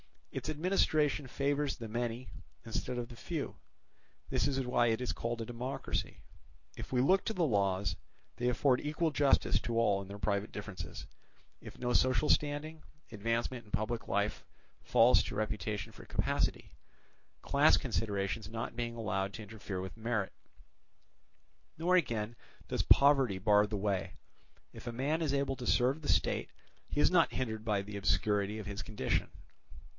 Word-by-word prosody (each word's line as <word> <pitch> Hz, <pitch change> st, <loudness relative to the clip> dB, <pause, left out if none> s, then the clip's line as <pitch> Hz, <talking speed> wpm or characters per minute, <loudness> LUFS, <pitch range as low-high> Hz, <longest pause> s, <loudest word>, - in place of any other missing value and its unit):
Its -, -, -4 dB
administration 155 Hz, -3 st, +1 dB
favours 140 Hz, +2 st, 0 dB
the 115 Hz, -3 st, -7 dB
many 120 Hz, +2 st, -3 dB, 0.4 s
instead 120 Hz, +2 st, -3 dB
of 120 Hz, -1 st, -4 dB
the 120 Hz, -, -10 dB
few; 155 Hz, +4 st, -4 dB, 0.7 s
this -, -, +1 dB
is 135 Hz, -1 st, 0 dB
why 120 Hz, -1 st, +3 dB
it 115 Hz, +1 st, +1 dB
is 125 Hz, -, -1 dB
called 115 Hz, 0 st, -3 dB
a -, -, -3 dB
democracy. 120 Hz, +3 st, -4 dB, 0.5 s
If -, -, -8 dB
we 125 Hz, -1 st, +3 dB
look 185 Hz, +8 st, +4 dB
to 220 Hz, -, -1 dB
the 180 Hz, -5 st, +1 dB
laws, 100 Hz, -5 st, +1 dB, 0.4 s
they 120 Hz, -, 0 dB
afford 125 Hz, +1 st, +3 dB
equal 155 Hz, +2 st, 0 dB
justice 145 Hz, -2 st, +3 dB
to 115 Hz, -1 st, -3 dB
all 105 Hz, -4 st, +3 dB
in 95 Hz, -, -9 dB
their 100 Hz, +1 st, -7 dB
private 100 Hz, +1 st, -1 dB
differences; 100 Hz, -2 st, -7 dB, 0.5 s
if -, -, -11 dB
no 125 Hz, 0 st, -1 dB
social 130 Hz, +5 st, +3 dB
standing, 150 Hz, +2 st, +1 dB, 0.3 s
advancement 115 Hz, +3 st, -2 dB
in 105 Hz, -, -18 dB
public 115 Hz, +2 st, -2 dB
life 100 Hz, +1 st, 0 dB, 0.4 s
falls 120 Hz, +2 st, +5 dB
to -, -, -5 dB
reputation 105 Hz, -1 st, -2 dB
for -, -, -13 dB
capacity, -, -, -1 dB, 0.7 s
class -, -, +5 dB
considerations 100 Hz, 0 st, -2 dB
not 115 Hz, +1 st, -4 dB
being 120 Hz, -1 st, -3 dB
allowed 100 Hz, -4 st, -2 dB
to 110 Hz, -, -7 dB
interfere 105 Hz, -3 st, -6 dB
with 95 Hz, +1 st, -7 dB
merit; 110 Hz, -3 st, -1 dB, 1.5 s
nor 175 Hz, +3 st, +3 dB
again 115 Hz, -9 st, 0 dB, 0.3 s
does -, -, 0 dB
poverty 135 Hz, -8 st, +5 dB
bar 105 Hz, +2 st, +4 dB
the 105 Hz, 0 st, -3 dB
way, 100 Hz, -1 st, -1 dB, 0.6 s
if -, -, -10 dB
a 120 Hz, -, -3 dB
man 145 Hz, +7 st, 0 dB
is 150 Hz, -4 st, 0 dB
able 140 Hz, -1 st, 0 dB
to 125 Hz, -, -6 dB
serve 130 Hz, +5 st, +3 dB
the 145 Hz, -, -6 dB
state, -, -, +1 dB, 0.4 s
he 145 Hz, -, 0 dB
is -, -, +5 dB
not 170 Hz, -3 st, +4 dB
hindered 110 Hz, -4 st, -3 dB
by 105 Hz, -3 st, +1 dB
the 100 Hz, 0 st, -6 dB
obscurity 105 Hz, 0 st, +1 dB
of 110 Hz, -, -6 dB
his 100 Hz, +1 st, -4 dB
condition. 105 Hz, -12 st, -1 dB
115 Hz, 160 wpm, -33 LUFS, 105-140 Hz, 1.5 s, falls